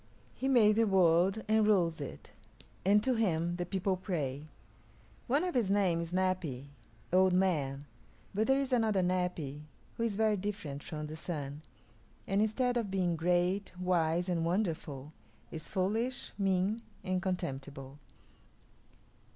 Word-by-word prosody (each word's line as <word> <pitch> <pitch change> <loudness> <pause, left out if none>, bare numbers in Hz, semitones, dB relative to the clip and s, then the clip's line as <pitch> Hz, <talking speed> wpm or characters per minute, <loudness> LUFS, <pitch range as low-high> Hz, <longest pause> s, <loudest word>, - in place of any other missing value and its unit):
He 265 - -3
made 220 -5 +5
the 230 - +5
world 190 +2 +3
and 220 0 +4
rules 170 -7 +2
it, 130 - -8 0.5
and 205 +2 +4
to 260 - +2
him 175 -6 0
the 175 -1 -3
people 190 0 0
pray. 155 -7 -3 0.8
One 285 +7 +2
of 360 - -1
his 235 -6 +1
names 180 -4 +2
is 170 - -10
Napi 170 -8 -1 0.4
old 185 0 +5
man; 150 -7 +1 0.5
but 215 +3 +1
there 265 +1 +4
is 275 -2 -1
another 220 -6 +2
Napi 180 -6 -1 0.4
who 230 - -1
is 225 -3 0
very 215 0 +2
different 185 -8 -4
from 155 -1 -6
the 155 +1 -6
Sun, 150 -3 -5 0.6
and 195 +1 +1
instead 245 +3 +1
of 225 -4 -1
being 185 -3 0
great, 180 +4 +1
wise, 175 -1 +1
and 170 -2 0
wonderful, 160 -6 -2 0.4
is 160 0 -6
foolish, 225 +7 -1
mean, 195 +2 +1 0.2
and 185 -1 -1
contemptible. 140 -6 -4
185 Hz, 145 wpm, -32 LUFS, 160-210 Hz, 0.8 s, made